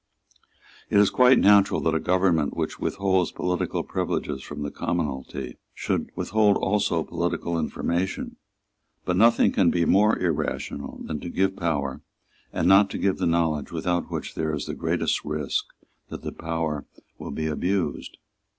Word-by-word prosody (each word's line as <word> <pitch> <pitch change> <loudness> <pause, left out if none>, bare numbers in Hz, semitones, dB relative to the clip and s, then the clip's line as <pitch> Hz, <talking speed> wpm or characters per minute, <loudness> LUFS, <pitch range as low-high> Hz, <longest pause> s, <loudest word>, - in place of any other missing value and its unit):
It - - +2
is 100 -1 +5
quite 125 0 +6
natural 100 -1 +5
that 80 - +1
a 80 - +1
government 90 -4 +1
which - - -3
withholds 95 -3 0
political 90 -1 -2
privileges 70 -3 -2
from 75 +2 -7
the 75 - -4
commonalty 70 -6 -3 0.2
should - - -2
withhold 105 -1 +2
also 95 -5 +1
political 85 0 -2
information. 85 +3 -2 0.7
But 90 - 0
nothing 115 +4 +5
can 95 -4 +3
be 85 -1 +1
more 105 +5 +4
irrational 75 -4 -3
than 75 - -4
to 85 - -6
give 95 +2 0
power, 75 -7 -2 0.5
and - - 0
not 100 +1 +6
to - - -4
give 95 -1 0
the - - +1
knowledge 80 -3 0
without 85 +1 -1
which - - -5
there 80 -1 -1
is 75 - -4
the - - -4
greatest - - -1
risk 75 -2 -2 0.4
that - - -7
power 80 -3 -3 0.3
will - - -7
be 80 +2 -3
abused. 90 +4 -2
85 Hz, 150 wpm, -25 LUFS, 75-95 Hz, 0.7 s, quite